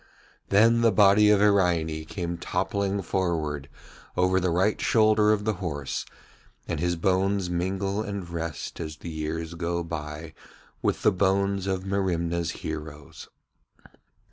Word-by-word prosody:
Then 115 +3 +5
the 115 -1 +5
body 105 +1 +6
of 105 -1 +5
Iraine 85 -6 +2
came 85 0 -4
toppling 100 +2 -1
forward 80 -6 -2 0.5
over 90 +1 +3
the 90 0 0
right 95 +5 +1
shoulder 110 -3 +4
of 105 -1 0
the 110 - +1
horse, 75 -6 -3 0.6
and 80 - -2
his 85 +1 0
bones 95 +1 +1
mingle 95 +3 -1
and 100 -4 -5
rest 85 -2 -5
as 80 -2 -5
the 85 - -7
years 80 +1 -4
go 85 0 -2
by 80 -1 -6 0.5
with - - -1
the - - +5
bones 100 0 +1
of 95 -1 -2
Merimna's 85 -4 -1 0.2
heroes. 75 -2 -7
90 Hz, 135 wpm, -26 LUFS, 80-100 Hz, 0.6 s, body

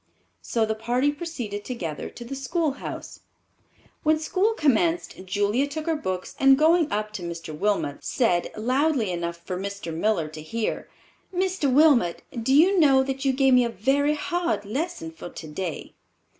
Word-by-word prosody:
So 225 -2 0
the 220 - -1
party 245 +6 +1
proceeded 260 -10 -5
together 175 - -5
to 240 - -10
the 275 - -6
schoolhouse. 280 +2 -3 0.8
When 310 +1 +3
school 370 +7 +1
commenced 325 - +1
Julia 205 +8 +1
took 305 +2 -5
her 330 -1 +1
books 185 -10 -4
and 270 0 +6
going 320 +1 +4
up 210 0 -1
to 200 - -5
Mr. 170 -2 -6
Wilmot, 185 -5 -1
said, 180 -9 +1
loudly 255 -1 +1
enough 170 -1 -3
for 180 +2 -5
Mr. 200 -4 -5
Miller 170 -2 +1
to 155 0 -9
hear: 220 +9 -3 0.4
"Mr. 370 -6 0
Wilmot, 265 - +4 0.2
do 230 - 0
you 365 +6 +5
know 270 -4 +5
that 270 +1 -4
you 270 - +4
gave 265 0 +3
me 250 0 +6
a 235 - 0
very 280 +7 +1
hard 340 -7 -1
lesson 325 - -3
for 320 - -9
today?" 160 +1 -6
255 Hz, 160 wpm, -25 LUFS, 200-305 Hz, 0.8 s, and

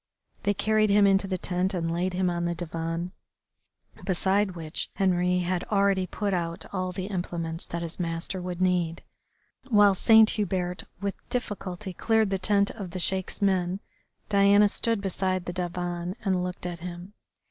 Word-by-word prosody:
They 205 0 +1
carried 215 +1 +2
him 200 0 +5
into 195 0 +3
the 190 -1 -1
tent 185 +1 -1
and 165 -1 -1
laid 180 +2 -1
him 185 0 +1
on 175 -1 -1
the 170 0 -1
divan, 165 +1 -3 0.9
beside 190 +1 +1
which 160 -2 -4
Henri 180 -2 +2
had 180 0 -1
already 195 -2 +2
put 205 0 -2
out 170 -2 -2
all 185 -1 -1
the 185 0 -4
implements 170 -4 -4
that 170 0 -4
his 170 +1 -6
master 170 +2 -2
would 180 0 -3
need. 175 -2 0 0.7
While 205 -3 +6
Saint 220 +3 +6
Hubert, 185 -3 -2 0.2
with 200 -1 -5
difficulty, 195 -5 -4
cleared 220 +2 +2
the 195 - 0
tent 200 +1 +2
of 200 -5 -7
the 185 - -5
Sheik's 190 +2 0
men 185 -1 +1 0.5
Diana 200 0 +5
stood 230 0 0
beside 185 -1 -1
the 175 - -4
divan 175 0 -3
and 185 -2 +1
looked 180 0 -5
at 175 -1 -4
him. 175 +3 -8
185 Hz, 165 wpm, -27 LUFS, 175-200 Hz, 0.9 s, While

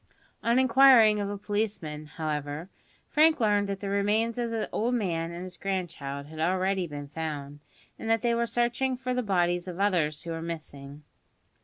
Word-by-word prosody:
On 235 +1 +2
inquiring 255 -4 +6
of 200 -1 -2
a 205 - -4
policeman, 200 -8 -3
however, 150 +1 -4 0.4
Frank 310 0 +4
learned 205 -3 +2
that 195 -1 -4
the 200 - -3
remains 215 +4 +1
of 235 -1 -1
the 225 -1 -2
old 240 +3 0
man 170 -7 -1
and 170 +1 -6
his 185 -1 -8
grandchild 160 -8 -4
had 155 +2 -10
already 185 +2 +1
been 145 -2 -7
found, 145 -2 -5 0.4
and 225 - -4
that 225 -1 +2
they 235 -1 +2
were 235 0 +1
searching 240 +2 0
for 255 0 -2
the 250 - 0
bodies 175 -4 +1
of 180 0 -6
others 170 -7 +1
who 170 - -5
were 165 0 -4
missing. 150 -3 -7
190 Hz, 180 wpm, -28 LUFS, 160-225 Hz, 0.4 s, inquiring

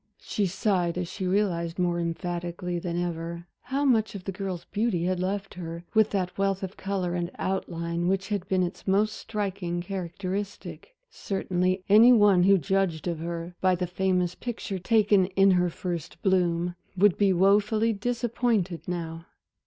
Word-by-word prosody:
She 205 -2 0
sighed 180 -2 0
as 180 -1 -2
she 185 +2 -4
realized, 180 -4 0
more 175 -1 +1
emphatically 175 +1 -3
than 170 0 -3
ever, 170 0 -4 0.2
how 275 +3 -1
much 220 -6 +2
of 195 - -7
the 195 - -3
girl's 190 -2 -5
beauty 210 -5 -1
had 185 0 0
left 195 +2 -2
her 170 -1 -7
with 220 -1 +4
that 185 -3 -2
wealth 195 -1 0
of 190 +1 -5
color 190 -3 -2
and 175 -1 -2
outline 170 -2 -2
which 190 +1 0
had 200 -3 -2
been 185 -1 +2
its 180 +3 -5
most 210 +3 +2
striking 195 -6 -3
characteristic. 195 - -5 0.2
Certainly 185 -1 -1
any 220 +5 +8
one 205 -5 +5
who 195 +2 +6
judged 190 -3 0
of 170 -2 -2
her 170 +1 -5
by 185 -1 +4
the 180 +1 -2
famous 180 0 0
picture, 225 -5 -5
taken 205 -1 +3
in 195 0 +6
her 180 -1 +3
first 170 -2 -5
bloom, 175 -2 +2 0.2
would 200 0 +5
be 200 -2 +3
wofully 205 +4 +3
disappointed 225 -4 -1
now. 165 -2 -5
185 Hz, 160 wpm, -27 LUFS, 175-200 Hz, 0.2 s, any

